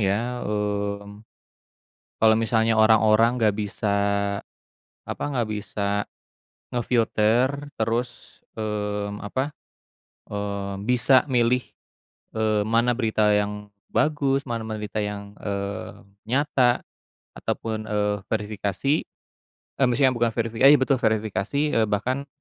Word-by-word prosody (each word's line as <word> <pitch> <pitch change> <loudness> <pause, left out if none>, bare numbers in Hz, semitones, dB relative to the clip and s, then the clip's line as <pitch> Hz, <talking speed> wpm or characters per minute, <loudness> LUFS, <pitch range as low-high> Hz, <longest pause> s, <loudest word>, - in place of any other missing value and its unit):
ya, 115 +5 0
mmm, 100 0 -3 1.0
kalo 110 0 +6
misalnya 115 0 +2
orang-orang 110 +2 +4
nggak 105 -2 +3
bisa 105 0 -3 1.2
apa - - -4
nggak 120 -4 0
bisa 105 -1 -2 0.7
nge-filter 120 +3 +1
terus, 115 +2 -3 0.2
mmm, 105 -1 -3
apa, 130 +7 -3 0.8
eee, 100 -1 -3
bisa 125 +2 +4
milih, 125 -1 +2 0.6
eee, 110 -1 +1
mana 115 +3 +2
berita 110 -3 +2
yang 105 0 -2 0.2
bagus 140 -3 +1
mana 115 -1 -2 0.2
berita 105 0 -3
yang, 100 0 -5
eee, 100 -1 -4 0.3
nyata 130 -3 +2 0.5
ataupun, 110 -1 -3
eee, 105 -1 0
verifikasi, 105 +4 -1 0.8
e - - 0
maksudnya 130 +2 +3
bukan 120 -2 0
verifikasi 115 +2 +1
eh, 145 - +10
betul, 130 -1 +2
verifikasi, 110 +2 0
eee, 110 -1 +2
bahkan 130 +7 -1
110 Hz, 105 wpm, -24 LUFS, 105-120 Hz, 1.2 s, eh